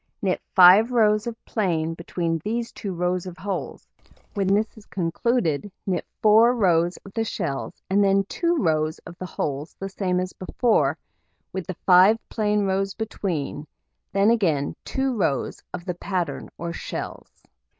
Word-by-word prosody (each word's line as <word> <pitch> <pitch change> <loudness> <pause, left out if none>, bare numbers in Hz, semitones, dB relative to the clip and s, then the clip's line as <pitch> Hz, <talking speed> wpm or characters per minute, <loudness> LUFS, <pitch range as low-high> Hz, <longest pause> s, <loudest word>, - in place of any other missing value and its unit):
Knit 190 -2 -1
5 190 +6 +8
rows 215 -2 +3
of 235 -1 -7
plain 165 -7 0
between 165 -1 -2
these 230 +2 -2
2 200 - -5
rows 180 +1 -1
of 180 -1 -8
holes; 195 -1 -5 0.5
when 195 -3 0
this 210 +3 +1
is 215 -2 -15
concluded, 180 - -1
knit 185 -2 -1 0.2
4 225 +3 +6
rows 175 -5 +2
of 195 - -12
the 225 - 0
shells, 140 -7 -4
and 200 +2 +3
then 195 0 +3
2 340 - 0
rows 155 - +1
of 170 - -10
the 185 - -5
holes 145 -2 -4
the 195 - -4
same 185 -2 -1
as 185 0 -3
before, 225 +5 +1 0.6
with 190 -3 -4
the 185 - -5
5 185 +4 +7
plain 210 -2 +1
rows 195 0 0
between, 175 -9 -3 0.4
then 200 +3 +4
again 165 -11 +1
2 265 -1 -1
rows 155 - -1
of 175 - -6
the 180 - -2
pattern 175 -4 -3
or 170 0 -4
shells. - - -7
190 Hz, 160 wpm, -24 LUFS, 170-215 Hz, 0.6 s, 5